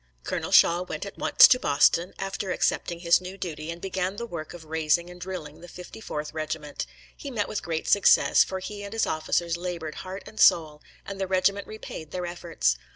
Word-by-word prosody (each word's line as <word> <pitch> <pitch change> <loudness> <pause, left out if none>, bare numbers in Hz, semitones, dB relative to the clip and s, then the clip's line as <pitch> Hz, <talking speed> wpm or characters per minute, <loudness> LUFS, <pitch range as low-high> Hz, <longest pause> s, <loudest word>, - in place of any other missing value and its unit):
Colonel - - -3
Shaw 170 +1 +6
went 180 - -5
at - - -8
once - - +8
to 250 - +4
Boston, 165 +4 +2
after 195 0 -4
accepting 170 -1 -1
his 170 0 +4
new 185 +1 -8
duty, 160 -4 -6
and 170 +1 -5
began 190 +1 -2
the 235 - -5
work 170 -8 -7
of 165 -2 -12
raising 160 +2 0
and 180 0 -13
drilling 180 -5 -7
the 175 - -11
54th 175 -4 -7
Regiment. 155 -2 -4 0.3
He 285 - -8
met 220 -6 -2
with 210 - -3
great 160 -1 -3
success, 200 - +5
for 190 - -5
he 205 +2 -7
and 200 +1 -7
his 225 - +1
officers 170 +2 -1
labored 170 -3 -5
heart 190 +1 -7
and 215 - -11
soul, 155 -3 +4 0.2
and 195 0 -6
the 190 - -1
regiment 195 +2 +1
repaid 215 -7 -8
their 180 +1 -4
efforts. 170 - -1
175 Hz, 200 wpm, -26 LUFS, 160-195 Hz, 0.3 s, once